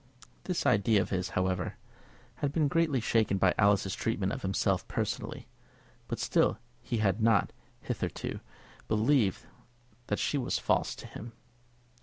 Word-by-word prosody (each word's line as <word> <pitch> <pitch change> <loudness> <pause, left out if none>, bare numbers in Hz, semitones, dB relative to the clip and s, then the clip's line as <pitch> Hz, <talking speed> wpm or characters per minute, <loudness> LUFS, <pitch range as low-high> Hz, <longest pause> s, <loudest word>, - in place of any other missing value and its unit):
This 180 -2 -1
idea 105 +1 +4
of 95 - -2
his, 95 -1 -1
however, 95 0 0 0.6
had 145 - -1
been 155 -1 +2
greatly 155 -2 +2
shaken 110 -3 +2
by 95 -1 +4
Alice's 100 -2 +3
treatment 100 -3 -1
of 135 - -4
himself 95 -1 0
personally; - - -3 0.6
but - - -3
still - - +2 0.2
he 120 - -2
had 105 0 +1
not, 110 -4 +3 0.3
hitherto, - - -3 0.5
believed 110 -2 +2 0.6
that - - 0
she 145 - 0
was 125 - 0
false - - +1
to - - -10
him. 115 +2 -9
110 Hz, 140 wpm, -30 LUFS, 95-125 Hz, 0.6 s, idea